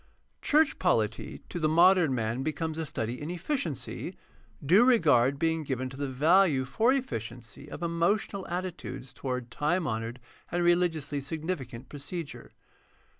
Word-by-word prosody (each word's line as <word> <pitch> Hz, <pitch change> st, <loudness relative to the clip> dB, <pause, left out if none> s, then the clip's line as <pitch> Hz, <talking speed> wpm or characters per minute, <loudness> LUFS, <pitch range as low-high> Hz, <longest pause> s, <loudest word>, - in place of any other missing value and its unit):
— -, -, -44 dB
Church 305 Hz, 0 st, +4 dB
polity 110 Hz, -, 0 dB
to 175 Hz, -, -4 dB
the 155 Hz, -1 st, +2 dB
modem 170 Hz, -3 st, +5 dB
man 115 Hz, +1 st, -1 dB
becomes 155 Hz, +2 st, -2 dB
a 160 Hz, -, -2 dB
study 120 Hz, +1 st, -3 dB
in 150 Hz, -, -4 dB
efficiency, 175 Hz, -, -3 dB, 0.5 s
due 185 Hz, -, +6 dB
regard 145 Hz, -, +4 dB
being 160 Hz, +1 st, +1 dB
given 130 Hz, -3 st, -3 dB
to 135 Hz, -, -10 dB
the 140 Hz, 0 st, -2 dB
value 150 Hz, +1 st, +4 dB
for 225 Hz, -, +2 dB
efficiency 125 Hz, -, -4 dB
of 160 Hz, -, -7 dB
emotional 185 Hz, +4 st, 0 dB
attitudes 175 Hz, -7 st, -5 dB
toward 125 Hz, -3 st, -4 dB
time 160 Hz, +6 st, 0 dB
honored 115 Hz, 0 st, -3 dB, 0.3 s
and 175 Hz, 0 st, 0 dB
religiously 160 Hz, -5 st, +1 dB
significant 140 Hz, -5 st, -5 dB
procedure. 150 Hz, +3 st, -7 dB
155 Hz, 140 wpm, -29 LUFS, 130-175 Hz, 0.5 s, due